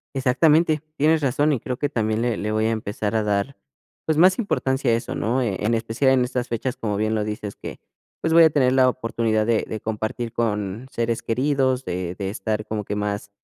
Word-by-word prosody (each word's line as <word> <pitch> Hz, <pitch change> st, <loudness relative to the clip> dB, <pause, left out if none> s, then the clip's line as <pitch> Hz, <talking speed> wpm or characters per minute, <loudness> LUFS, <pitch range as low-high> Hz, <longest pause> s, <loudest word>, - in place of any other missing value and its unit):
Exactamente, 150 Hz, +4 st, +3 dB
tienes 160 Hz, +2 st, +3 dB
razón. 145 Hz, +3 st, +2 dB
Y, 135 Hz, -, 0 dB
creo 125 Hz, -, -4 dB
que 145 Hz, +3 st, -2 dB
también 110 Hz, -4 st, -1 dB
le 120 Hz, -3 st, 0 dB
le 105 Hz, +1 st, -2 dB
voy 110 Hz, +1 st, +1 dB
a 115 Hz, -, +1 dB
empezar 110 Hz, 0 st, -2 dB
a 110 Hz, -, +1 dB
dar, 105 Hz, +6 st, -1 dB, 0.5 s
pues, 155 Hz, -1 st, 0 dB
más 185 Hz, +5 st, +5 dB
importancia 135 Hz, -, 0 dB
a -, -, +3 dB
eso, 115 Hz, -, -4 dB
¿no?, 120 Hz, +4 st, 0 dB
eh, 105 Hz, -6 st, -1 dB
en 110 Hz, +3 st, 0 dB
especial 115 Hz, +4 st, +1 dB
en 130 Hz, -1 st, +3 dB
estas 125 Hz, 0 st, -2 dB
fechas, 125 Hz, +2 st, -3 dB
como 105 Hz, -2 st, -2 dB
bien 110 Hz, +2 st, 0 dB
lo 105 Hz, -1 st, -1 dB
dices, 105 Hz, -1 st, -5 dB
que, -, -, -8 dB, 0.4 s
pues, 160 Hz, -, 0 dB
voy 165 Hz, +1 st, +7 dB
a 160 Hz, -, +7 dB
tener 130 Hz, -4 st, +2 dB
la 130 Hz, -1 st, +4 dB
oportunidad 115 Hz, -3 st, 0 dB
de 115 Hz, -1 st, +1 dB
de 110 Hz, -, -5 dB
compartir 110 Hz, +2 st, -3 dB
con 105 Hz, +1 st, -2 dB
seres 115 Hz, -2 st, -2 dB
queridos, 130 Hz, +1 st, 0 dB
de 90 Hz, 0 st, -4 dB
de 95 Hz, -2 st, -3 dB
estar 105 Hz, +1 st, -3 dB
como 105 Hz, -2 st, -4 dB
que 105 Hz, -, -3 dB
más 105 Hz, 0 st, -3 dB
115 Hz, 220 wpm, -23 LUFS, 110-130 Hz, 0.5 s, voy